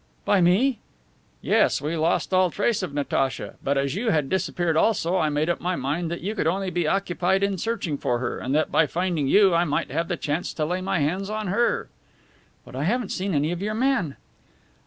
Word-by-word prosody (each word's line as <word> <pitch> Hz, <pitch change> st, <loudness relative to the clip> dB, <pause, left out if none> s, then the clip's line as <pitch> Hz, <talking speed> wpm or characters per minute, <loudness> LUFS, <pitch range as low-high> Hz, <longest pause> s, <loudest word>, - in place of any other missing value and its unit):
"By 200 Hz, -2 st, +3 dB
me?" 210 Hz, +8 st, +3 dB, 0.6 s
"Yes, -, -, +3 dB
we 150 Hz, +3 st, -3 dB
lost 165 Hz, +4 st, 0 dB
all 185 Hz, -1 st, +4 dB
trace 205 Hz, +5 st, 0 dB
of 185 Hz, -, -4 dB
Natacha. 140 Hz, -2 st, -1 dB
But, 140 Hz, +1 st, +1 dB
as 135 Hz, 0 st, 0 dB
you 220 Hz, +6 st, -1 dB
had 150 Hz, -7 st, +1 dB
disappeared 175 Hz, -3 st, 0 dB
also, 180 Hz, -1 st, +2 dB
I 155 Hz, -3 st, +2 dB
made 150 Hz, +1 st, 0 dB
up 175 Hz, -, -1 dB
my 180 Hz, +1 st, -1 dB
mind 155 Hz, +5 st, -2 dB
that 170 Hz, -, -4 dB
you 205 Hz, +4 st, -2 dB
could 190 Hz, -, -1 dB
only 190 Hz, +2 st, -1 dB
be 175 Hz, -3 st, 0 dB
occupied 190 Hz, +1 st, +1 dB
in 200 Hz, -2 st, 0 dB
searching 195 Hz, -10 st, -2 dB
for 120 Hz, -, 0 dB
her, 120 Hz, 0 st, -3 dB
and 130 Hz, +3 st, -2 dB
that 155 Hz, -, +1 dB
by 160 Hz, -, +3 dB
finding 170 Hz, -2 st, -1 dB
you 195 Hz, +4 st, +5 dB
I 170 Hz, +1 st, +3 dB
might 150 Hz, -5 st, -1 dB
have 165 Hz, +4 st, -1 dB
the 175 Hz, -, -2 dB
chance 155 Hz, +4 st, -3 dB
to 155 Hz, -, -1 dB
lay 180 Hz, +4 st, -2 dB
my 190 Hz, 0 st, -1 dB
hands 185 Hz, +7 st, -1 dB
on 215 Hz, -2 st, -3 dB
her." 235 Hz, +5 st, +1 dB, 0.8 s
"But -, -, -12 dB
I 140 Hz, +3 st, -2 dB
haven't 235 Hz, +3 st, 0 dB
seen 190 Hz, -2 st, -2 dB
any 145 Hz, +3 st, +1 dB
of 175 Hz, +1 st, -4 dB
your 215 Hz, +2 st, -2 dB
men?" 230 Hz, -, 0 dB
175 Hz, 220 wpm, -24 LUFS, 155-195 Hz, 0.8 s, you